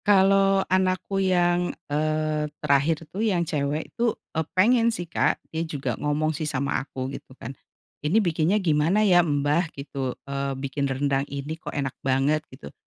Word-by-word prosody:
Kalau 195 -1 +4
anakku 185 +1 0
yang, 175 -1 +2
eee, 155 0 -1
terakhir 150 +2 +1
tuh, 200 - -3
yang 190 -6 +1
cewek 150 0 -2
tuh, 235 -1 0 0.2
eee, 160 - +1 0.2
pengen 230 +4 +5
sih, 200 -6 -3
Kak. 165 - +1 0.2
Dia 160 - -1
juga 140 -6 -3
ngomong 150 +2 0
sih 150 0 -3
sama 140 -1 -1
aku, 130 -2 -6
gitu 130 - -10
kan, 125 +4 -7 0.5
"Ini 150 +8 +1
bikinnya 175 -1 +2
gimana 175 +3 +2
ya, 180 -3 +6
Mbah?" 150 +1 +1
gitu. 135 -2 -4
Eee, 140 -1 -3
"Bikin 140 +1 -2
rendang 135 +1 0
ini 140 +2 -4
kok 160 - -8
enak 135 -2 -2
banget?" 135 +3 +2
gitu. 75 - -11
155 Hz, 165 wpm, -25 LUFS, 140-185 Hz, 0.5 s, ya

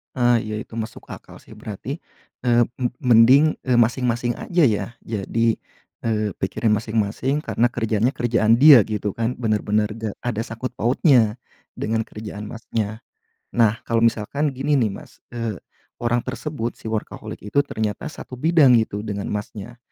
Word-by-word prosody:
Ah 120 -2 +3
iya 110 -1 -5
itu - - -20
masuk 110 -1 -6
akal - - -11
sih. - - -19
Berarti, 120 - -6 0.5
eee, 120 0 +5 0.2
me 125 - +1 0.2
mending, 125 +6 +6
eee, 125 - +3
masing-masing 120 0 +1
aja 175 -1 +1
ya 105 -7 +2 0.2
jadi, 115 +2 0 0.5
eee, 110 -2 0
pikirin 105 +3 0
masing-masing 110 +6 0
karena 120 - +1
kerjaannya 115 +1 0
kerjaan 115 -2 +3
dia 135 -3 +8
gitu 105 -2 -2
kan? 115 +2 -1
Benar-benar 105 -2 0
nggak 110 -1 -5
ada 120 -3 -1
sangkut 115 +3 -5
pautnya, 120 -2 +3 0.4
dengan 110 +1 -1
kerjaan 105 -1 -7
Masnya. 110 -1 -4 0.5
Nah 115 -2 +3
kalau 115 -1 +1
misalkan 115 +6 +1
gini 135 +3 -1
nih 115 -4 +2
Mas, 100 - -11
eee, 115 -4 -4 0.4
orang 120 0 +1
tersebut 125 -1 -4
si 110 - -8
workaholic 110 -1 -5
itu 140 +8 +2
ternyata 110 +2 -3
1 130 - -11
bidang 150 -1 +4
itu 105 -2 -4
dengan 100 -2 -4
Masnya, 105 +3 -6
115 Hz, 150 wpm, -22 LUFS, 110-125 Hz, 0.5 s, dia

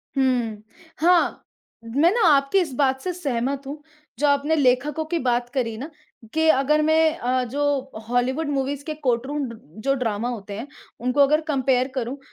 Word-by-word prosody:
हुँ, 245 -5 0 0.4
हाँ, 345 +2 +3 0.4
मैं 280 +10 +2
ना 470 +3 +1
आपकी 280 +4 +4
इस 330 -7 -2
बात 265 -1 +1
से 365 - -3
सहमत 275 -4 -2
हूँ, 295 +2 -7 0.4
जो 295 - +3
आपने 285 +2 +2
लेखकों 285 +2 +1
की 335 +2 -1
बात 240 0 0
करी 230 -4 -1
ना 275 +7 -6 0.4
कि 320 0 +2
अगर 300 +1 +3
मैं 315 +1 +3
अ, 255 -1 0
जो 275 +1 -1 0.2
हॉलीवुड 260 +5 0
मूवीज़ 275 0 -2
के 310 - -3
कोर्टरूम 265 +5 0
ड 230 - -9 0.3
जो 275 - +2
ड्रामा 230 -2 -2
होते 205 -4 -6
हैं, 235 +6 -6 0.3
उनको 250 +4 -1
अगर 300 +3 +3
कम्पेयर 260 -3 +1
करूँ 255 +1 -3
275 Hz, 170 wpm, -23 LUFS, 250-300 Hz, 0.4 s, आपकी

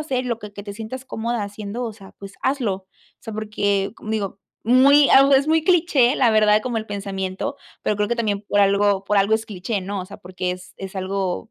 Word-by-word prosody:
hacer 260 -4 -2
y - - -4
lo 235 - -1
que 210 -2 -10
que 205 - -8
te 200 - -6
sientas 230 +4 -7
cómoda 230 -1 -2
haciendo, 205 +4 -6
o 225 - -4
sea, 195 -3 -15
pues, 195 0 -10
hazlo. 260 -7 0
O 190 0 -13 0.3
sea, 225 - -8
porque 205 -2 -1
com 215 - -8
digo, 200 -2 -3 0.2
muy 275 +4 +6
ah, 275 +1 +7
u 280 - +2
es 275 +2 +4
muy 320 0 +3
cliché, 315 -8 +3
la 245 -4 +4
verdad, 215 -1 +4
como 245 -2 -3
el 220 - -6
pensamiento, 195 +3 -4 0.3
pero 210 - 0
creo 210 0 0
que 240 - -1
también 210 -3 -1
por 205 - +3
algo 200 0 +3
por 205 +1 0
algo 200 +3 +3
es 220 0 -1
cliché, 200 0 -3
¿no?, 200 +1 -4
o 185 - -7
sea, - - -10
porque 185 0 -4
es 180 0 -11
es 195 0 -7
algo 190 +2 -3
210 Hz, 240 wpm, -22 LUFS, 195-240 Hz, 0.3 s, ah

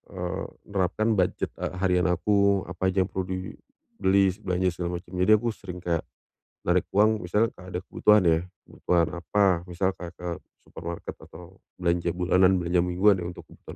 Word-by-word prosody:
eee, 90 -2 -3 0.3
nerapkan 100 +3 0
budget 90 - 0
e - - -2 0.2
harian 90 -1 +3
aku, 100 +2 +2
apa 95 +1 -1
aja 95 0 +2
yang 90 - -8
perlu 95 -1 -3
dibeli, 100 - -1
se 95 - -13
belanja 90 -2 0
segala 85 0 -4
macam. 90 0 -8
Jadi 90 +4 +3
aku 115 +3 -1
sering 90 -4 -9
kayak 85 -2 0 0.6
narik - - +3
uang 110 +2 +3
misalnya 105 +6 +2
ka 90 0 -12
ada 90 - -2
kebutuhan 105 +1 +4
ya, 80 -1 +4 0.3
kebutuhan 85 -2 +1
apa 90 0 +2
misalkan 90 -1 -2
ke 90 -1 -4 0.3
supermarket 85 0 -7
atau 90 +2 -14 0.2
belanja 85 -1 0
bulanan, 90 +1 +4
belanja 90 0 +1
mingguan 90 +3 +3
ya 85 - -4
untuk 90 - -8
kebutuhan - - -20
ke - - -8
90 Hz, 175 wpm, -26 LUFS, 90-100 Hz, 0.6 s, kebutuhan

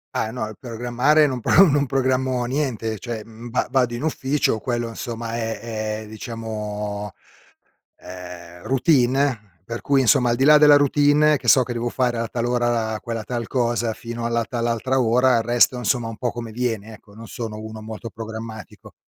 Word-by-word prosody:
Ah 110 - 0
no, 110 -2 -4
il 110 - -9
programmare 125 +5 +2
non 130 -4 -1
pro 195 - +6
non 145 -1 +2
programmo 130 -1 0
niente, 120 -5 -2
cioè, 115 -3 -5
mhmm, 115 +1 -11
va 125 - 0
vado 125 -3 +1
in 120 - -5
ufficio, 140 -6 0
quello 120 -1 -2
insomma 115 -1 -5
è 110 -1 -4
è - - -12
diciamo, 105 -2 -5 0.8
ehm, 90 -1 -10
routine, 130 - +1
per 115 +4 -5
cui 140 -1 +2
insomma 120 0 +4
al - - +2
di 130 - 0
là 150 +2 +8
della 150 -1 +7
routine 145 +1 +4
che - - -9
so 130 - +6
che 125 - -7
devo 120 0 -2
fare 120 -1 0
a 115 - -2
tal 115 +1 -3
ora 120 -2 0
quella 115 -2 -4
tal 120 0 -4
cosa, 120 -2 0
fino 115 +1 -6
alla 115 0 0
tal 120 0 -3
altra 130 +3 0
ora 125 +1 +3
il 115 - 0
resto 120 +2 +3
insomma 120 -1 0
un 115 - -8
po' 120 0 -1
come 115 -2 -6
viene, 115 -2 -3
ecco, 105 -1 -20
non 115 +2 -11
sono 110 -1 -6
uno 110 0 -8
molto 110 +1 -7
programmatico. 110 0 -9
120 Hz, 185 wpm, -22 LUFS, 110-130 Hz, 0.8 s, là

